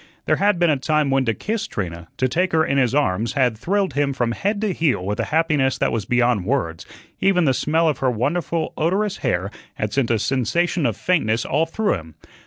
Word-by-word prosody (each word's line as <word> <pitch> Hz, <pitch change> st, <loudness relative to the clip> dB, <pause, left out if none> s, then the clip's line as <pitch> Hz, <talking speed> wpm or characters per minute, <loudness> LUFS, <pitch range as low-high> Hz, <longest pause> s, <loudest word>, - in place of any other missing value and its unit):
There -, -, +2 dB
had 205 Hz, -1 st, +2 dB
been 170 Hz, -2 st, +3 dB
a 145 Hz, -, +1 dB
time 150 Hz, +1 st, +1 dB
when 135 Hz, -1 st, +2 dB
to 115 Hz, -, +1 dB
kiss 220 Hz, -, -3 dB
Trina, 85 Hz, -4 st, -5 dB
to 130 Hz, -, +2 dB
take 175 Hz, +8 st, 0 dB
her 160 Hz, 0 st, +3 dB
in 140 Hz, 0 st, +1 dB
his 125 Hz, 0 st, +1 dB
arms, 115 Hz, -6 st, +1 dB
had 125 Hz, -5 st, +2 dB
thrilled 190 Hz, -, -1 dB
him 140 Hz, 0 st, 0 dB
from 120 Hz, -3 st, -1 dB
head 200 Hz, -, -1 dB
to 210 Hz, -3 st, 0 dB
heel 140 Hz, -, 0 dB
with 105 Hz, +3 st, -3 dB
a 115 Hz, -, 0 dB
happiness 155 Hz, -5 st, +1 dB
that -, -, 0 dB
was 110 Hz, -4 st, -2 dB
beyond 120 Hz, -3 st, +2 dB
words; 90 Hz, -8 st, -2 dB, 0.3 s
even 180 Hz, -3 st, +3 dB
the 135 Hz, -, +3 dB
smell 160 Hz, +5 st, +1 dB
of 155 Hz, -, 0 dB
her 130 Hz, -, +2 dB
wonderful 160 Hz, +7 st, -1 dB
odorous 195 Hz, +5 st, 0 dB
hair 90 Hz, +3 st, -1 dB, 0.2 s
had 105 Hz, -1 st, -3 dB
sent 135 Hz, -4 st, +1 dB
a 115 Hz, -, +2 dB
sensation 145 Hz, -, 0 dB
of 110 Hz, -, -3 dB
faintness 115 Hz, -11 st, +1 dB
all 155 Hz, +4 st, +1 dB
through 210 Hz, +6 st, 0 dB
him. 80 Hz, -4 st, -7 dB
135 Hz, 220 wpm, -21 LUFS, 115-170 Hz, 0.3 s, been